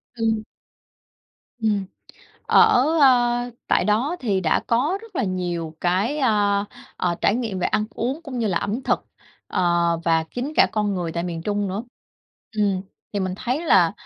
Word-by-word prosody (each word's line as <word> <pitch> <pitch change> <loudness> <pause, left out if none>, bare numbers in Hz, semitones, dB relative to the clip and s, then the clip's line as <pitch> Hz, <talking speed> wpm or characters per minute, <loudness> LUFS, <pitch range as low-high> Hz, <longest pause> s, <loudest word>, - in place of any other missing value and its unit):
Ừm. 225 -2 0 1.2
Ừm. 205 -3 +1 0.6
Ở, 250 - +5 0.2
a, 245 -2 +4 0.2
tại - - +2
đó 245 +11 +1
thì 205 -6 0
đã 165 -4 +2
có 285 +12 +1
rất 450 -7 -12
là - - +1
nhiều 175 -4 -3
cái, 195 +12 +1
a, 205 -5 +2 0.3
à, 175 -1 0
trải - - +3
nghiệm 225 -6 -2
về 180 - +1
ăn 210 - 0
uống, 255 +9 -3
cũng 270 -5 -6
như 230 - 0
là 180 -5 +1
ẩm 220 +6 -3
thực, - - 0 0.4
ờ, - - -1 0.4
và 165 -1 +2
chính 255 +5 -3
cả - - +7
con 210 -2 0
người 175 -3 -3
tại 170 - -2
miền 165 -2 -4
Trung 205 0 -1
nữa. 195 +4 -3 0.7
Ừm, 200 -3 +1 0.3
thì 205 - -1
mình 185 -1 -2
thấy 260 +9 -2
là, 175 - +5
210 Hz, 170 wpm, -23 LUFS, 185-245 Hz, 1.2 s, cả